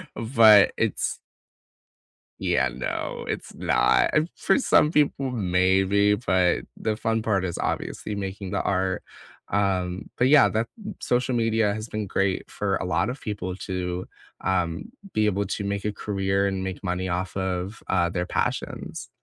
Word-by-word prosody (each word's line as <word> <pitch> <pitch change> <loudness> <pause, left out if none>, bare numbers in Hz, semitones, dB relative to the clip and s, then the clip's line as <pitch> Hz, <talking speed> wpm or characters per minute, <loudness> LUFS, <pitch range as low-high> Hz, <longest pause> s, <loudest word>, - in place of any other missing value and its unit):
but 110 -3 +6
it's - - -1 1.2
Yeah, 65 0 +2
no, 65 0 -4
it's - - -4
not. - - +2 0.3
For - - +2
some 155 - +4
people, 140 -2 +2
maybe, 95 0 +3
but 95 -5 +2 0.2
the 110 -1 -1
fun 115 0 0
part 100 -4 +1
is 85 -2 -3
obviously 105 - -3
making 95 -1 -5
the - - 0
art, 95 -1 0 0.5
um, 95 -2 0
but 125 +1 +3
yeah, 150 0 +7
that 110 +2 -1 0.3
social 125 +1 0
media 115 -3 +2
has 110 +2 -6
been 110 -1 -3
great 95 0 -1
for - - -1
a - - -4
lot - - +1
of 130 - -5
people 100 -4 -4
to, 90 -1 -3 0.4
um, 90 -3 -1 0.3
be 110 0 +1
able 100 0 +1
to 100 - -3
make 100 0 -2
a 105 - +1
career 100 -1 -1
and 95 -1 -2
make 95 0 -5
money 90 0 -2
off 90 +1 -2
of, 95 +2 -3
uh, 85 -2 +2
their 90 +1 -2
passions. - - -3
100 Hz, 155 wpm, -25 LUFS, 95-110 Hz, 1.2 s, yeah